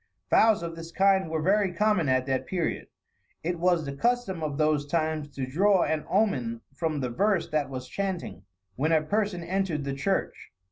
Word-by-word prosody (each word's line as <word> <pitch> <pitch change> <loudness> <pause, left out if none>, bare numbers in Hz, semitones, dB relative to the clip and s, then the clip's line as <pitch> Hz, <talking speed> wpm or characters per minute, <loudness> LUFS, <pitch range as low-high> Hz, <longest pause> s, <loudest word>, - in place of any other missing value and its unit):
Vows 220 -5 +5
of 165 -1 -5
this 165 0 -9
kind 190 -1 +3
were 160 -1 -2
very 195 +1 +3
common 210 -4 +1
at 130 0 +2
that 130 -1 -1
period. 175 -3 -2 0.6
It 175 +1 -2
was 175 -2 +2
the 140 - -4
custom 235 - 0
of 150 -3 -3
those 155 -2 +1
times 155 -1 -1
to 135 - -2
draw 185 +8 +3
an 155 -1 -2
omen 125 - 0
from 155 0 -2
the 125 - -1
verse 200 - +1
that 150 -3 0
was 130 -1 -6
chanting, 180 - -4 0.3
when 155 +5 0
a 160 -1 +3
person 200 +1 -1
entered 175 -4 -1
the 140 0 -3
church. 190 +9 -2
165 Hz, 185 wpm, -27 LUFS, 145-195 Hz, 0.6 s, Vows